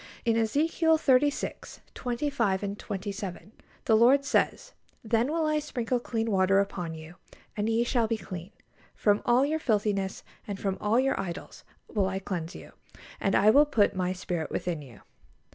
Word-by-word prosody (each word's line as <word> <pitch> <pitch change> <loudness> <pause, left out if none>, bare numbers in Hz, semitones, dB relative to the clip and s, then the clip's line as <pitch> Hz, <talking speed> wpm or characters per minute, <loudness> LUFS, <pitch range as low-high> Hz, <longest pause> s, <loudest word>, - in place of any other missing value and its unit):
In 230 -1 +3
Ezekiel 315 +8 +2
xxxvi. 280 -1 0
25 240 -6 -1
and 200 +1 -4
27, 200 -2 -6 0.3
the 220 - +4
Lord 260 +5 +5
says, - - 0 0.3
"Then 230 +4 +1
will 325 0 0
I 305 0 +1
sprinkle 250 -4 -2
clean 225 -2 -2
water 195 0 +3
upon 180 -4 -2
you, 160 +2 -11 0.4
and 210 +1 -1
ye 225 +1 +2
shall 240 -2 +1
be 225 0 -1
clean: 185 -3 -8 0.5
from 205 -1 +2
all 245 +3 +5
your 310 +2 -1
filthiness, 205 -6 0 0.2
and 200 -2 -5
from 195 -1 -2
all 215 +4 +2
your 270 +1 +1
idols, 185 -2 -6 0.2
will 200 -4 0
I 190 0 -2
cleanse 180 -3 -4
you.... - - -11 0.5
And 195 - +1
I 210 +2 +6
will 290 +5 +6
put 215 -9 +2
My 185 -1 0
Spirit 180 -3 -3
within 170 -4 -3
you." 125 -7 -14
215 Hz, 165 wpm, -28 LUFS, 190-250 Hz, 0.5 s, I